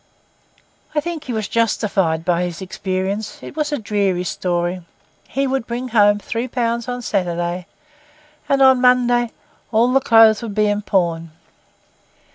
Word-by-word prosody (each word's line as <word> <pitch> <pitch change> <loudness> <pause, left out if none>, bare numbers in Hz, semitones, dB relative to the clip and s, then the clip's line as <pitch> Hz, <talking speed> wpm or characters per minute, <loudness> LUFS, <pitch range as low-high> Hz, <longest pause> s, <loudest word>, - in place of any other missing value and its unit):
I - - +3
think 335 0 -5
he 255 - -5
was 220 -4 -2
justified 195 -7 0
by 175 -1 +1
his 175 -2 -3
experience. 190 +2 -3
It - - -9
was 300 -1 -1
a 295 - 0
dreary 200 -5 -1
story. 175 0 -2 0.5
He 275 +1 -1
would 265 -3 -2
bring 245 +2 -4
home 205 -3 +4
three 230 +4 -4
pounds 235 -1 -2
on 245 0 -4
Saturday, 175 -3 -2 0.8
and 275 -1 +4
on 265 -1 +5
Monday 245 -1 +3 0.4
all 235 +3 +3
the 270 - +5
clothes 225 -2 +5
would 220 -4 -6
be 215 -1 +3
in 205 0 0
pawn. 170 -5 0
215 Hz, 150 wpm, -19 LUFS, 185-245 Hz, 0.8 s, on